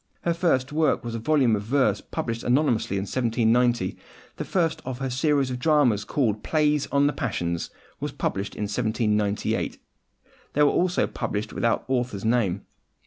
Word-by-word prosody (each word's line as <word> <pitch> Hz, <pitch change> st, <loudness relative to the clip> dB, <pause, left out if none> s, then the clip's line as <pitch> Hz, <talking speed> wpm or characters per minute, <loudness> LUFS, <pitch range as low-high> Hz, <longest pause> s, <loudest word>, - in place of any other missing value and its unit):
Her 170 Hz, -, +1 dB
first 160 Hz, -6 st, +1 dB
work 155 Hz, 0 st, +2 dB
was 120 Hz, -1 st, -5 dB
a 115 Hz, -, -3 dB
volume 130 Hz, -3 st, +3 dB
of 105 Hz, -, -2 dB
verse 110 Hz, -2 st, +1 dB
published 115 Hz, 0 st, -4 dB
anonymously 120 Hz, -6 st, +1 dB
in 95 Hz, -, -1 dB
1790. 120 Hz, -2 st, +1 dB, 0.4 s
The -, -, -3 dB
first 170 Hz, -4 st, 0 dB
of 130 Hz, -1 st, -5 dB
her 135 Hz, -1 st, -3 dB
series 135 Hz, 0 st, +1 dB
of 125 Hz, -, -4 dB
dramas, 130 Hz, -8 st, +3 dB
called 110 Hz, -7 st, 0 dB
Plays 150 Hz, -2 st, +1 dB
on 140 Hz, 0 st, +2 dB
the 145 Hz, -, +2 dB
Passions, 85 Hz, -8 st, -2 dB, 0.3 s
was -, -, -3 dB
published 100 Hz, +2 st, -3 dB
in -, -, -3 dB
1798. 105 Hz, -1 st, 0 dB
These -, -, -21 dB, 0.8 s
were 145 Hz, -, +5 dB
also 180 Hz, 0 st, +1 dB
published 105 Hz, +1 st, -4 dB
without 115 Hz, -, 0 dB
the 130 Hz, -, -1 dB
author's 120 Hz, -5 st, -2 dB
name. 105 Hz, -5 st, +1 dB
120 Hz, 165 wpm, -25 LUFS, 105-145 Hz, 0.8 s, were